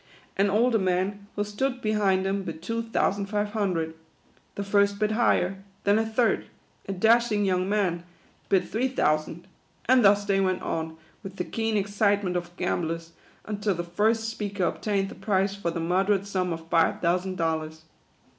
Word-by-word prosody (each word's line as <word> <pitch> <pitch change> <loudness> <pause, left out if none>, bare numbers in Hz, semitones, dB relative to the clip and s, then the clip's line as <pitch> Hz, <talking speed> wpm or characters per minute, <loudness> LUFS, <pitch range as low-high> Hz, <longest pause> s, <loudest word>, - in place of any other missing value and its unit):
An 200 +1 +2
older 225 +3 +3
man, 190 +2 -1
who 205 - 0
stood 250 +5 -2
behind 205 -4 +1
him, 195 +1 0
bid 165 -3 -7
two 230 +3 -2
thousand 205 -3 0
five 205 0 -1
hundred. 180 -7 -1 0.6
The 200 - -3
first 200 0 +2
bid 215 0 +1
higher; 195 -4 +1 0.2
then 205 +2 +3
a 225 - +1
third, 225 +1 +1 0.4
a - - -2
dashing 220 +1 +3
young 185 0 +1
man, 190 -5 +1 0.5
bid 190 -2 +2
three 240 +4 0
thou 155 -12 +2
sand; 155 +2 -10 0.4
and 255 0 +5
thus 200 0 +5
they 195 -1 +2
went 185 -1 0
on, 160 0 -3 0.2
with 195 0 -9
the - - -3
keen 225 -1 -1
excite 205 0 +1
ment 180 -2 -2
of 175 0 -4
gamblers, 165 0 -2 0.3
until 205 -2 -1
the 175 - -3
first 220 +6 +1
speaker 205 -3 -3
obtained 195 +2 0
the - - -8
prize, 195 0 0
for 200 -4 -2
the 170 0 -3
moderate 190 +4 +1
sum 185 -3 -1
of 165 0 -6
five 165 -1 +2
thousand 180 +2 0
dollars. 160 -1 -2
195 Hz, 175 wpm, -26 LUFS, 180-210 Hz, 0.6 s, and